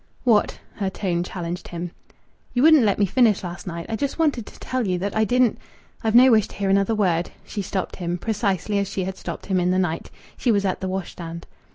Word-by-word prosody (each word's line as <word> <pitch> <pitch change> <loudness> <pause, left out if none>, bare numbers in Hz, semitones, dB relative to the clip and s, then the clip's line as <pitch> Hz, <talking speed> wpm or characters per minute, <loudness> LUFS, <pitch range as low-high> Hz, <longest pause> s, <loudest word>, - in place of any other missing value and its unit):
"What?" 225 -5 +3 0.2
Her 195 -3 -1
tone 180 -3 -1
challenged 175 -1 -5
him. 175 0 -5 0.6
"You 245 - +2
wouldn't 310 -6 +7
let 200 - +2
me 205 - +3
finish 220 0 +3
last 175 +1 -7
night. 170 -1 -5
I 225 - -2
just 280 +4 -2
wanted 290 -9 +1
to - - -12
tell 255 -4 -2
you 180 -1 +1
that 195 +3 -3
I 220 0 +3
didn't 245 +1 +2 0.2
" - - -30
"I've 220 0 +1
no 255 +2 +8
wish 215 -3 +4
to - - -13
hear 195 -1 0
another 200 +3 +3
word." 175 -5 +1 0.2
She 205 - -4
stopped 190 -1 -3
him, 175 -1 -2
precisely 205 -1 -1
as 200 - -1
she 190 - -3
had 190 +1 -4
stopped - - -7
him 190 -2 +1
in 180 0 +1
the 185 - +2
night. 175 -3 -1 0.3
She 245 - +2
was 200 -2 +2
at 190 - -1
the 190 - -2
washstand. 170 -3 -5
195 Hz, 235 wpm, -23 LUFS, 180-220 Hz, 0.6 s, no